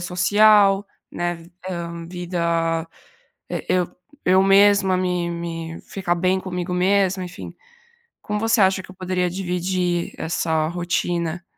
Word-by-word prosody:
social, 200 +2 +4 0.3
né, 175 0 -1
vi 165 +1 -15 0.2
hã, 170 -2 -5
vida, 170 -2 -1 0.6
eh, - - -4
eu 180 -2 +1 0.4
eu 185 +1 +5
mesma 195 0 +5
me 180 -1 -1
me 165 -1 -5
ficar 180 -3 -1
bem 185 +2 +1
comigo 180 -1 -4
mesma, 190 0 +2
enfim. 180 0 -9 0.7
Como 210 0 -3
você 225 0 +2
acha 190 0 +3
que - - -14
eu - - -16
poderia 180 -1 -1
dividir 180 -1 -2
essa 160 -1 0
rotina? 175 0 -2
180 Hz, 130 wpm, -22 LUFS, 170-190 Hz, 0.7 s, eu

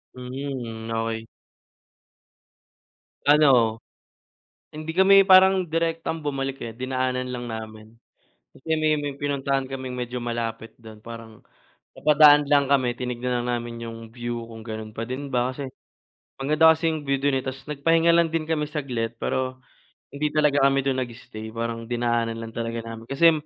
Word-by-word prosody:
Hmm, 125 -3 -6
okey. 115 0 -2 2.0
Ano, 130 -7 +5 1.0
hindi 155 +1 -5
kami 195 +2 +6
parang 190 -1 +6
direktang 165 0 -2
bumalik, 135 -2 -3
eh, 115 -1 -6
dinaanan 130 0 -2
lang 120 -1 -5
namin. 110 -1 -7 0.7
Kasi 160 +4 -2
may 155 -1 +2
may 145 -1 -4
pinuntahan 140 -1 -1
kaming 130 -1 -6
medyo 125 0 -4
malapit 115 -1 -4
dun 110 -2 -13
parang 115 -1 -10 0.5
napadaan 150 -1 +6
lang 140 -1 +4
kami 130 -3 +3
tinignan 125 0 -2
lang - - -4
namin 115 0 -7
yung 115 0 -7 0.2
view 120 -1 -4
kung 115 -1 -10
gano'n 110 -1 -7
pa 115 - -3
din 130 +4 -5
ba 125 -1 0
kasi 135 +1 -6 0.7
maganda 155 +4 +5
kasi 165 +1 -2 0.2
view 140 0 +1
do'n, 140 -2 +2
eh. - - -15
Tapos 130 0 -5
nagpahinga 165 +3 +3
lang 170 -1 +4
din 160 -1 0
kami 150 -2 0
saglit 125 -7 -3
pero 130 0 -2 0.5
hindi 150 +1 -2
talaga 145 -2 +3
kami 135 0 +1
dun 135 -1 +1
nag-stay 110 -2 -8
parang 115 0 -4
dinaanan 120 -1 0
lang 115 0 -7
talaga 115 0 -3
namin 115 0 -9
kasi 165 +5 +5
130 Hz, 150 wpm, -24 LUFS, 115-145 Hz, 2.0 s, kami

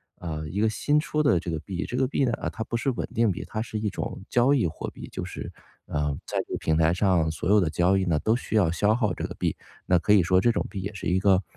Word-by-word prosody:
呃， 80 -3 -5
一 100 +5 -3
个 110 - +3
新 145 +7 +1
出 150 0 -1
的 95 - +3
这 90 - -5
个 80 - -2
币， 90 +3 -4
这 125 - -5
个 130 0 +2
币 140 0 +1
呢， 120 - 0
啊， - - -1
它 110 - -5
不 115 - -5
是 130 +4 0
稳 120 - -2
定 115 -3 +3
币， 90 - -5
它 110 - -4
是 110 -1 -4
一 105 - -1
种 95 - -4
交 125 +3 +4
易 140 -9 +3
货 80 -2 -4
币， - - -10
就 - - -5
是， - - -7 0.3
呃， 75 -2 -1
在 - - -2
这 - - -14
个 - - -1
平 80 - 0
台 80 +1 +4
上 90 -3 +2
所 80 +4 -2
有 105 - +6
的 85 - +1
交 90 +4 +2
易 95 - +2
呢 80 -3 +2
都 110 +1 +2
需 120 - -4
要 90 -6 +4
消 105 +5 +2
耗 110 -7 0
这 - - -6
个 - - -8
币， - - -1 0.3
那 90 -1 +3
可 95 - 0
以 100 -4 +6
说 95 +2 +3
这 120 - +4
种 - - -1
币 95 - -4
也 100 +2 -4
是 - - -7
一 90 +2 +2
个， 95 0 +3
95 Hz, 320 characters per minute, -26 LUFS, 85-110 Hz, 0.3 s, 有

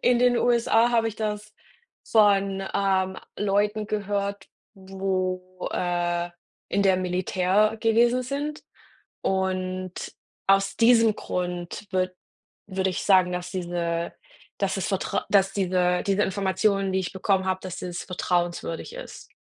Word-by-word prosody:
in 245 -1 +4
den 245 -1 +4
USA 235 -1 +3
habe 230 -1 +2
ich 225 - -8
das 215 0 -3 0.5
von, 200 -3 +3
ähm, 190 -1 +1 0.2
Leuten 205 +1 +1
gehört, 200 -1 -2 0.3
wo 185 -1 -3
äh, 175 -1 -1 0.4
in 200 - +1
der 190 -2 +4
Militär 185 +3 +1
gewesen 235 +2 +3
sind. 285 +4 -4 0.6
Und 185 -1 -2 0.3
aus 195 0 +3
diesem 230 -2 +5
Grund 180 +2 -4
würd 185 0 0 0.5
würde 190 -1 0
ich 185 - -3
sagen, 185 -2 +5
dass 180 0 -4
diese 170 -2 -2 0.4
dass 195 -1 0
das 190 - -2
Vertrau 195 -2 -1
dass 195 -1 +4
diese 180 -2 +1
diese 200 +1 +2
Informationen, 195 0 +1
die 190 - +1
ich 185 - -4
bekommen 190 0 +1
habe 185 0 0
dass 185 -2 -6
das 180 -1 -5
vertrauenswürdig 175 - -2
ist. - - -10
190 Hz, 130 wpm, -25 LUFS, 185-210 Hz, 0.6 s, diesem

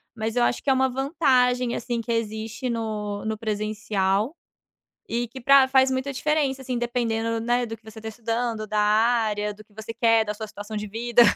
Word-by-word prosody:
Mas 220 +1 -3
eu 245 - +2
acho 245 - 0
que - - 0
é 270 - +6
uma 265 0 +2
vantagem, 255 -3 +2
assim, 240 -2 -2
que 230 - -4
existe 225 +2 -3
no 215 -3 -3
no 220 0 -2
presencial, 210 - -1 0.7
e 240 -4 -1
que 260 +3 -9
pra 270 +1 +6
faz 265 0 +5
muita 260 +2 -1
diferença, 275 -1 0
assim, 255 -1 -3
dependendo, 230 -2 -1
né, 240 +2 +1
do 225 -1 -6
que 220 - -36
você 220 0 -11
tá 220 - -6
estudando, 230 0 -2
da 215 0 -2
área, 210 -1 +2
do 215 - -15
que 210 - -30
você 220 +2 -7
quer, 225 -1 +4
da 210 0 -3
sua 220 +1 -6
situação 210 +1 -7
de 210 0 -4
vida, 235 +3 +3
230 Hz, 200 wpm, -25 LUFS, 215-250 Hz, 0.7 s, é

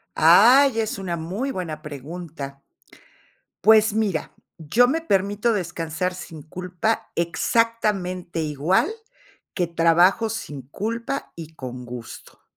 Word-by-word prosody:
Ay, 230 - +6
es 220 -2 -1
una 180 -3 -3
muy 190 +12 -3
buena 165 - -5
pregunta. 150 -1 -8 1.0
Pues 220 +1 +6
mira, 205 -8 -1 0.2
yo 225 +10 +3
me 320 - +1
permito 205 -4 +1
descansar 175 -1 -2
sin 165 -3 -9
culpa 180 +7 -3
exactamente 185 -1 0
igual 155 - +1 0.6
que 175 -2 0
trabajo 170 +6 +3
sin 150 -11 -6
culpa 230 - -4
y 160 -1 -10
con 125 -3 -7
gusto. 120 -1 -10
180 Hz, 110 wpm, -23 LUFS, 160-220 Hz, 1.0 s, Ay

